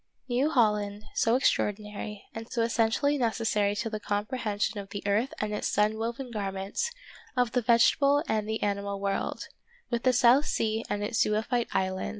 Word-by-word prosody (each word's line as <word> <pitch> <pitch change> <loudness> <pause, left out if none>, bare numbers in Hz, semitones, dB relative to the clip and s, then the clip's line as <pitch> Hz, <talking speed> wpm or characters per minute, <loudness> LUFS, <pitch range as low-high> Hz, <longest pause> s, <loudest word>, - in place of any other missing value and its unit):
New 260 +4 +1
Holland, 210 -6 +1
so 225 +1 +2
extraordinary, 210 -4 -1
and 225 +1 -8
so 230 - +1
essentially 235 +6 +1
necessary 220 -4 +1
to 225 +2 -2
the 215 -1 -4
comprehension 210 0 -2
of 195 -1 -8
the 200 - -6
earth 210 +6 +1
and 210 0 -2
its 210 - -1
sun 210 +1 +2
woven 235 +3 -4
garment, 200 - -2 0.5
of 245 -2 +2
the 250 - +1
vegetable 275 +5 +4
and 215 -1 -1
the 220 - -2
animal 200 -1 -1
world, 195 0 -2 0.4
with 235 -1 0
the 255 - +4
South 250 +3 +5
Sea 220 0 0
and 205 0 -1
its 215 +2 -1
zoophyte 225 +3 0
islands. 190 0 -1
220 Hz, 165 wpm, -28 LUFS, 205-240 Hz, 0.5 s, South